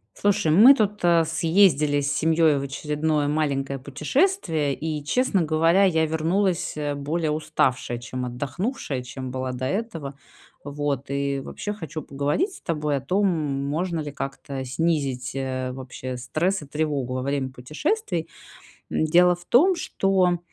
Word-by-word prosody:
Слушай, 200 -5 +1
мы 225 - +9
тут, 210 -3 0
э, 170 -1 +5
съездили 160 -3 +3
с 140 0 -1
семьей 160 -2 +3
в - - -4
очередное 150 +2 -1
маленькое 140 -3 -1
путешествие, 155 - 0
и, 155 0 -4
честно 200 - +1
говоря, 165 +4 +3
я 160 -4 +3
вернулась, 170 +4 0
э, 145 -1 -2
более 155 +3 -1
уставшая, 130 -5 0
чем 125 +1 -5
отдохнувшая, 140 - -3
чем 130 +1 -7
была 130 0 -3
до 125 +1 -4
этого. 165 - -3 0.5
Вот 145 -2 -3
и 140 0 -1
вообще, 205 +9 -5
хочу 160 -6 -6
поговорить 145 - -1
с - - -13
тобой 150 -3 -1
о - - -4
том, 190 +9 +1
можно 155 +2 -1
ли 150 -1 -5
как-то 135 -1 -5
снизить, 135 -3 -1
э, 130 -1 -2
вообще 130 0 -6
стресс 155 +10 -1
и - - -10
тревогу 145 -4 -2
во 130 - -2
время 135 0 -1
путешествий? 165 - -2 0.6
М, - - 0
дело 175 +3 +5
в 175 0 -17
том, 355 - +5
что, 190 - +1
150 Hz, 150 wpm, -24 LUFS, 135-175 Hz, 0.6 s, мы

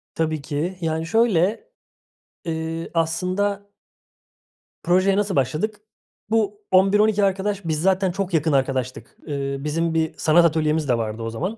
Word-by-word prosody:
Tabii 160 -2 -1
ki. 150 +6 -3
Yani, 160 0 -1
şöyle, 225 - +1 0.8
eee, 165 0 -4
aslında 185 +5 -1 1.1
Projeye 185 +2 +3
nasıl 205 -2 0
başladık? 155 - -1 0.5
Bu 210 -2 0
11-12 205 +2 +4
arkadaş 195 0 -1
biz 155 -2 -1
zaten 190 +1 +2
çok 190 0 -3
yakın 160 0 +2
arkadaştık. 130 -4 -2
Eee, 140 -2 -3
bizim 160 +3 -1
bir 160 -1 0
sanat 170 +2 +4
atölyemiz 155 -2 +1
de 120 - +3
vardı 110 0 -4
o 115 - -3
zaman. 180 - -4
165 Hz, 135 wpm, -22 LUFS, 150-195 Hz, 1.1 s, 11-12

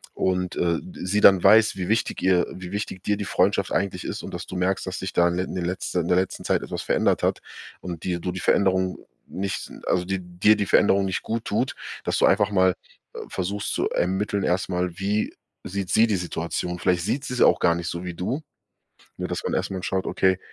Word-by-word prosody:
und, 90 -1 0
äh, 85 -1 +1 0.2
sie 100 +3 -1
dann 95 -2 +7
weiß, 110 +3 +6
wie 90 -1 -3
wichtig 110 +2 0
ihr 90 -1 +3
wie 90 0 -8
wichtig 100 -2 -4
dir 105 -1 0
die 100 - -4
Freundschaft - - +1
eigentlich 95 -2 -1
ist - - -4
und - - -7
dass - - -5
du - - -7
merkst, 95 +2 0
dass 95 - -4
dich 95 -1 -4
da 85 - +4
in 85 - -2
in 95 - -3
den 90 - -2
letzten 90 0 -2
in 85 - -4
der 90 - +4
letzten 95 0 -1
Zeit - - +1
etwas - - -5
verändert - - +1
hat - - +1 0.4
und 85 -3 -6
dir 90 -1 -1
du 90 +1 -3
die 95 - -5
Veränderung 95 -1 +2 0.3
nicht 100 +1 -4 0.2
also, 90 -1 +1
die 95 0 -2
dir 90 +4 +3
die 100 - -1
Veränderung 100 -1 +4
nicht 95 - -2
gut 115 0 -3
tut, 115 +5 -1 0.3
dass - - 0
du - - +5
einfach 100 +1 +3
mal, 95 -2 +3 0.4
äh, - - -5
versuchst 100 +2 -3
zu - - 0
ermitteln 95 +2 0
erstmal, 90 0 0
wie 105 +2 0 0.3
sieht 95 -1 -4
sie 115 - +5
die 105 -3 +1
Situation. 90 0 -3
Vielleicht 90 -2 +1
sieht 135 +9 -1
sie 125 - -4
es - - -1
auch - - +5
gar 85 - +4
nicht 85 0 -4
so 85 +1 -5
wie 90 - -4
du. 120 - -2 0.8
Nur, - - -2
dass - - -3
man - - -2
erstmal 95 0 -2
schaut, 95 0 -1
okay, 95 -1 +2
95 Hz, 225 wpm, -24 LUFS, 90-100 Hz, 0.8 s, dann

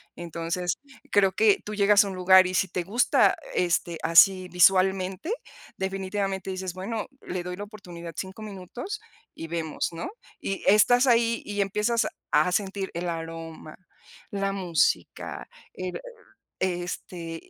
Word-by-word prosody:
Entonces, 170 +1 -3 0.3
creo 195 -2 +4
que 210 +2 +4
tú 210 - -5
llegas 205 0 +5
a - - -3
un 195 - -5
lugar 185 +1 +6
y 185 - -4
si 190 - +2
te 180 0 -2
gusta, 220 +2 +3 0.2
este, 170 -1 +1
así 185 +3 +6
visualmente, 185 - +3 0.5
definitivamente 195 0 -2
dices: 185 -1 -4
"Bueno, 205 +4 -4 0.2
le 180 -1 -3
doy 180 0 -5
la 205 - -5
oportunidad 175 -5 -10
5 190 +3 -6
minutos 215 - -7 0.3
y 165 - -7
vemos, 160 -2 -2
¿no?, 170 - -5 0.3
y 195 - -4
estás 245 +6 +5
ahí 230 -1 +3
y 205 0 -4
empiezas 210 +4 +1 0.3
a 155 +4 +4
sentir 195 0 -1
el 175 +1 -3
aroma, 165 -1 -7 0.6
la 195 -1 -1
música, 180 -5 -1 0.3
el, 185 -1 -5 0.6
este 175 -2 -4
190 Hz, 135 wpm, -26 LUFS, 175-205 Hz, 0.6 s, lugar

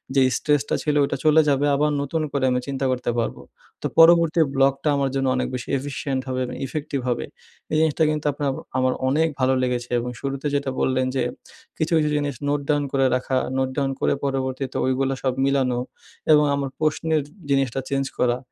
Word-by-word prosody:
যে 135 - +5 0.2
স্ট্রেসটা 145 -1 +1
ছিল 150 -1 0
ওটা - - -3
চলে 155 +1 +6
যাবে 140 +1 +2
আবার 150 +2 +2
নতুন 150 +3 -2
করে 140 -1 -1
আমি 125 - +1
চিন্তা 135 -1 -2
করতে 125 -1 -2
পারবো। 115 - -3 0.4
তো - - -1
পরবর্তী 165 0 +6 0.2
ব্লকটা 135 +2 +2
আমার 140 -1 +1
জন্য 135 -1 +1
অনেক 125 - 0
বেশি 125 - -6
efficient 140 -1 -3
হবে 130 0 -2
এবং 125 - -6
ইফেক্টিভ 145 -1 -3
হবে। 120 - -1 0.5
এই 155 - +2
জিনিসটা 160 0 +2
কিন্তু 155 0 -2
আপনার 140 0 -2 0.3
আমার 130 0 +2 0.2
অনেক 155 +4 +2
ভালো 130 0 +3
লেগেছে 125 -1 -2
এবং 125 - -4
শুরুতে 135 +1 -3
যেটা 140 -1 -1
বললেন 130 0 +1
যে 130 - +1 0.5
কিছু, 160 +1 -1
কিছু 150 -1 +2
জিনিস 145 -2 -1
নোট 145 0 +1
ডাউন 145 -1 +2
করে 135 -1 +2
রাখা, 130 +1 -1 0.2
নোট 130 0 +1
ডাউন 135 -1 +1
করে - - +2
পরবর্তীতে 135 -1 -2
ওইগুলো 135 +1 +1
সব 130 -2 +1
মিলানো 130 -3 +1 0.5
এবং 150 -1 +6
আমার 140 -1 -2
প্রশ্নের 155 0 +1 0.3
জিনিসটা 135 -2 +1
চেঞ্জ 135 -1 0
করা। 120 0 +2
135 Hz, 190 wpm, -23 LUFS, 130-150 Hz, 0.5 s, চলে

